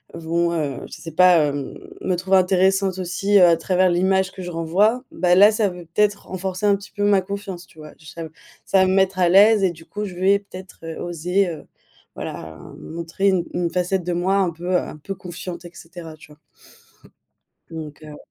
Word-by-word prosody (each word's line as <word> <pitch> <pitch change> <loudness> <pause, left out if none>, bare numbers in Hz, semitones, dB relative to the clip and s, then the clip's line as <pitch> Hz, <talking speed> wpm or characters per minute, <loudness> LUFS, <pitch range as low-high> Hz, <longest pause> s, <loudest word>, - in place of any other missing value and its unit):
vont, 170 +1 -1
heu, 150 -6 -2
je - - -14
sais 165 - -8
pas, 180 +2 +6
hem, 140 -1 -5 0.2
me 185 - 0
trouver 190 +2 +2
intéressante 190 +1 +2
aussi, 190 +3 +1
heu, 180 - +8
à 170 -1 +5
travers 185 +2 +2
l'image 190 +1 +1
que 190 - -10
je 180 - -6
renvoie. 190 +9 +1
Bah, 175 +1 +2
là 205 +3 +7
ça 215 -2 +1
veut 180 -1 -10
peut-être 205 +5 0
renforcer 190 +1 -4
un 200 -1 +4
petit 200 +1 -11
peu 205 - -3
ma 205 -2 +4
confiance, 190 -2 -7
tu - - -23
vois? 155 -1 -11
J 155 - -17
ça 165 - -7 0.4
ça 195 - +3
va 190 - +4
me 185 - +1
mettre 190 -1 +2
à 175 -1 +4
l'aise 205 +3 +6
et 190 - +4
du 165 -1 -14
coup 210 +4 -5
je 185 -3 -8
vais 195 +3 +3
peut-être, 190 -2 -12
heu, 165 0 -7
oser, 180 +3 -1
heu, 155 -4 -8 0.5
voilà - - -6 0.2
a - - -14
m - - -13
montrer 170 +4 -3
une 185 -3 +1
une 175 -1 -1
facette 180 +1 -1
de 175 +1 -2
moi 185 +3 +1
un 190 -2 +2
peu, 175 +2 -6
heu - - +6
un - - -8
peu 175 +6 -6
confiante, 175 -1 -8
et 175 - -10
cetera, 165 -1 -10
tu 150 0 -17
vois? 150 - -23 1.3
Donc, 155 -2 -8
heu. 150 -1 -10
180 Hz, 225 wpm, -21 LUFS, 170-195 Hz, 1.3 s, heu